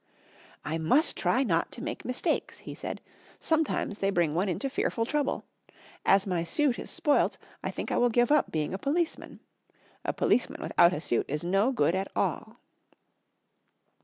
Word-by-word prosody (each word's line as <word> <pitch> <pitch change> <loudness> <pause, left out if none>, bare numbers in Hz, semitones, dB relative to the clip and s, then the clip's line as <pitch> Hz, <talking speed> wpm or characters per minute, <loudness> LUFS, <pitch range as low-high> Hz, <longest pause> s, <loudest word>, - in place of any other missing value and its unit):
"I 160 +2 -2
must 260 - +3
try 260 - +2
not 170 -9 0
to 245 - -7
make 305 +1 -5
mistakes," 250 0 -1
he - - -8
said, - - -6 0.4
"sometimes 315 -9 0
they 195 - +1
bring 170 -5 +1
one 185 +4 0
into 230 +10 -2
fearful 250 -4 -1
trouble. 290 +2 -1 0.6
As 195 0 +5
my 180 -4 -1
suit 265 - +1
is - - -7
spoilt 320 -4 +1 0.3
I - - -1
think - - -5
I - - +1
will 245 - +4
give 240 +3 +2
up 300 - +3
being 155 0 -1
a 190 - -3
policeman. 320 - -2 0.6
A - - 0
policeman 275 +5 +1
without 170 - +4
a 150 - -2
suit 120 -7 0
is 150 +3 -2
no 195 +8 +2
good 245 -9 +2
at 190 +1 -1
all." - - -2
230 Hz, 170 wpm, -28 LUFS, 175-280 Hz, 0.6 s, As